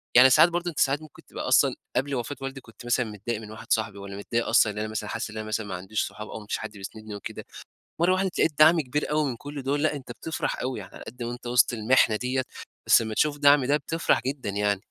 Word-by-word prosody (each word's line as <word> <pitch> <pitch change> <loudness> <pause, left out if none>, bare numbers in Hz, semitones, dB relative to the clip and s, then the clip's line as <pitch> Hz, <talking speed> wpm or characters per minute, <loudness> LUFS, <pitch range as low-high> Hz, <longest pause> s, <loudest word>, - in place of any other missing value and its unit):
يعني 130 +2 +9
ساعات 165 +7 +7
برضه 175 +1 -2
أنت 160 - -6
ساعات 140 +2 +2
ممكن 155 - -15
تبقى - - -6
أصلًا - - +4 0.2
قبل 135 +2 0
وفاة 125 +4 -3
والدي 135 0 -5
كنت 115 +1 -15
مثلًا 120 0 +1
متضايق 110 +1 -5
من 105 0 -10
واحد 110 - -10
صاحبي، 110 -2 +1
والَّا 100 0 -8
متضايق 115 +3 -2
أصلًا 105 -2 +4
إن - - -11
أنا 110 - -2
مثلًا 110 -1 -4
حاسس - - -3
إن 110 - -8
أنا 110 0 -5
مثلًا 110 0 -2
ما 95 - -5
عنديش 95 +4 -2
صحاب 105 0 -9
أو - - -6
ما 105 - -12
فيش - - -1
حد 110 - -6
بيسندني 110 +2 -8
وكده، 100 - -7 0.5
مرّه 180 +2 +4
وحدة 190 +1 +1
اتلاقيت 160 -4 0
دعم 160 +1 +7
كبير 150 +3 -2
أوي 150 -2 +1
من 120 - -4
كُلّ 145 0 -7
دُول، 145 +2 0
لأ 155 - +2
أنت 135 -2 -8
بتفرح 160 - -3
أوي 130 0 -3
يعني، - - -11
على - - -10
قد 120 +1 -7
ما 120 - -3
أنت 120 0 -8
وسط 120 0 +4
المِحنة 110 0 +3
ديَّة 130 +3 -1 0.4
بس - - +7
لمّا 110 -1 -4
تشوف 145 +4 +1
دعم 145 -2 +5
ده 145 +2 +3
بتفرح 165 +1 0
جدًا 135 -5 -3
يعني. 100 0 0
125 Hz, 260 wpm, -26 LUFS, 110-145 Hz, 0.5 s, يعني